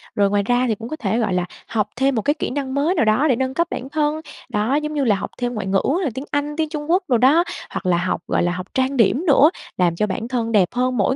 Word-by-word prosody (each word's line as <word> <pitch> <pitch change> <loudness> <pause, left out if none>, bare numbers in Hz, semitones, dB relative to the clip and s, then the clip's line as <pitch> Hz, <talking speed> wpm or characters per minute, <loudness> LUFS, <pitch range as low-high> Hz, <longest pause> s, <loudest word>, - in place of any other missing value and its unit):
rồi 200 -1 +3
ngoài 205 0 +1
ra 245 +2 +2
thì 220 - +1
cũng 230 +2 -8
có 310 - -3
thể, 225 -5 -1
gọi 215 -5 0
là, 180 -1 0 0.2
học 210 -3 0
thêm 265 +2 +1
một 220 - +1
cái 290 - +2
kỹ 310 - -3
năng 265 -1 -3
mới 295 +6 +1
nào 305 - +2
đó 220 +8 +3
để 260 - +3
nâng 260 +2 -2
cấp 340 +4 +1
bản 260 - -5
thân, 300 +1 0 0.3
đó, 215 +6 0
giống 300 +1 -1
như 290 -2 0
là, 220 -5 +3
học 190 - -5
thêm 245 -1 -2
ngoại 210 -4 -4
ngữ 195 0 +2 0.2
là 305 - +1
tiếng 265 +4 -6
Anh, 290 +1 -1
tiếng 315 -1 0
Trung 300 0 -4
Quốc 365 +2 +3
đồ 245 - +3
đó, 275 +8 +5 0.3
hoặc - - -5
là 180 -1 +3
học, 175 -1 -1
gọi - - +1
là, 175 - +1
học 180 +1 -5
trang 265 +1 0
điểm 245 - +3
nữa, 285 +1 +6 0.3
làm 175 -2 +2
cho 210 +5 0
bản 220 +4 -3
thân 235 -2 -2
đẹp 200 -5 +4
hơn 250 +1 0
mỗi 220 +5 +2
250 Hz, 295 wpm, -21 LUFS, 210-290 Hz, 0.3 s, nữa